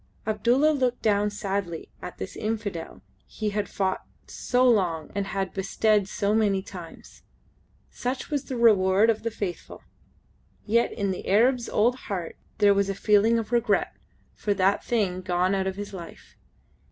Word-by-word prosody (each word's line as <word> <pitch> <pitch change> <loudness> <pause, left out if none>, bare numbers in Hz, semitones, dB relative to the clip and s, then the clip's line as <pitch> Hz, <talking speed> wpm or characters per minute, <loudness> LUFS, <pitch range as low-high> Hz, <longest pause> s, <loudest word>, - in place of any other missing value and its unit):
Abdulla 240 +8 +3
looked 255 -4 -1
down 210 -1 +2
sadly 195 -5 -4
at 180 - -8
this - - -6
Infidel 210 -6 -4 0.2
he 215 -1 -3
had 205 0 -2
fought 190 -1 -1 0.2
so 250 +1 +1
long 175 -9 +1
and 200 -1 -2
had 195 -1 -3
bested 200 +1 +1
so 205 -1 0
many 205 -3 +2
times. 175 -4 -11 0.7
Such 255 +5 -4
was 285 -2 -1
the 260 - -4
reward 210 -2 +5
of 220 - -4
the 230 - -2
Faithful! 200 -5 -6 0.8
Yet 235 +2 +2
in 200 -3 -2
the 185 - -6
Arab's 240 +5 +3
old 235 +4 +3 0.2
heart 180 -5 -4 0.2
there 205 -2 +5
was 200 0 +1
a 195 - -2
feeling 215 +3 +3
of 225 -1 -4
regret 240 0 +1 0.4
for 205 -1 -1
that 195 +1 +2
thing 195 -6 0
gone 180 +1 +1
out 190 -1 0
of 190 - -2
his 205 0 -7
life. 175 -3 -10
205 Hz, 160 wpm, -26 LUFS, 190-225 Hz, 0.8 s, reward